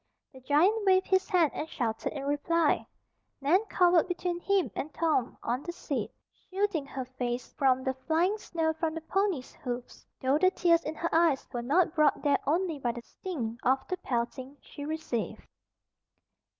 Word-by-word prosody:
The 260 Hz, -, -12 dB
giant 335 Hz, -, +3 dB
waved 375 Hz, -1 st, +4 dB
his 380 Hz, +2 st, +1 dB
hand 350 Hz, -7 st, +3 dB
and 315 Hz, -, -4 dB
shouted 225 Hz, -3 st, -2 dB
in 280 Hz, -2 st, -5 dB
reply. 295 Hz, +3 st, +1 dB, 0.5 s
Nan 320 Hz, +9 st, +3 dB
cowered 350 Hz, -2 st, +4 dB
between 355 Hz, -1 st, -2 dB
him 395 Hz, 0 st, +1 dB
and 305 Hz, -, -4 dB
Tom, 310 Hz, -7 st, 0 dB
on 245 Hz, +3 st, -1 dB
the 345 Hz, -, -5 dB
seat, 345 Hz, -, -3 dB, 0.4 s
shielding 375 Hz, -7 st, -1 dB
her 265 Hz, -2 st, -5 dB
face 250 Hz, -1 st, -4 dB
from 260 Hz, -2 st, +2 dB
the 265 Hz, -, 0 dB
flying 325 Hz, +9 st, +1 dB
snow 325 Hz, -5 st, -1 dB
from 320 Hz, 0 st, -2 dB
the 325 Hz, -, -4 dB
ponies' 370 Hz, -5 st, -1 dB
hoofs, 245 Hz, -1 st, -7 dB
though 265 Hz, +3 st, +2 dB
the 370 Hz, +2 st, +5 dB
tears 340 Hz, -3 st, +3 dB
in 310 Hz, -, -3 dB
her 335 Hz, +2 st, -2 dB
eyes 325 Hz, -4 st, +3 dB
were 240 Hz, -, -2 dB
not 310 Hz, +7 st, +2 dB
brought 305 Hz, -2 st, +3 dB
there 290 Hz, -1 st, +3 dB
only 330 Hz, 0 st, +1 dB
by 240 Hz, -3 st, -1 dB
the 240 Hz, -, -8 dB
sting 240 Hz, -12 st, -5 dB
of 265 Hz, +2 st, +1 dB
the 370 Hz, -, -1 dB
pelting 260 Hz, -1 st, -3 dB
she 285 Hz, -, -9 dB
received. 310 Hz, -7 st, -3 dB
310 Hz, 175 wpm, -29 LUFS, 260-350 Hz, 0.5 s, the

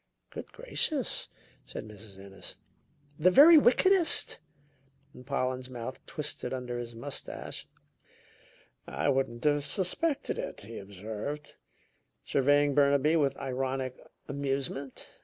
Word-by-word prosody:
"Good -, -, -8 dB
gracious!" 315 Hz, -, 0 dB, 0.4 s
said 110 Hz, -, -7 dB
Mrs. 105 Hz, -2 st, -12 dB
Ennis. 95 Hz, 0 st, -9 dB, 0.6 s
"The 175 Hz, +4 st, +6 dB
very 305 Hz, -, +9 dB
wickedest!" 345 Hz, +6 st, +5 dB, 0.9 s
Pollen's 130 Hz, -2 st, -2 dB
mouth 125 Hz, +1 st, -7 dB
twisted 145 Hz, -4 st, -4 dB
under 125 Hz, -1 st, -4 dB
his 120 Hz, -1 st, -7 dB
mustache. 140 Hz, +5 st, -6 dB, 1.2 s
"I -, -, -1 dB
wouldn't 130 Hz, -3 st, 0 dB
have 145 Hz, -1 st, +2 dB
suspected 215 Hz, -, 0 dB
it," -, -, -5 dB
he 110 Hz, +3 st, -8 dB
observed, 105 Hz, +9 st, -6 dB, 0.7 s
surveying 145 Hz, +1 st, +3 dB
Burnaby 140 Hz, +2 st, +4 dB
with 140 Hz, -4 st, +1 dB
ironic 130 Hz, -1 st, -3 dB, 0.3 s
amusement. 140 Hz, -1 st, -3 dB
135 Hz, 100 wpm, -30 LUFS, 125-150 Hz, 1.2 s, very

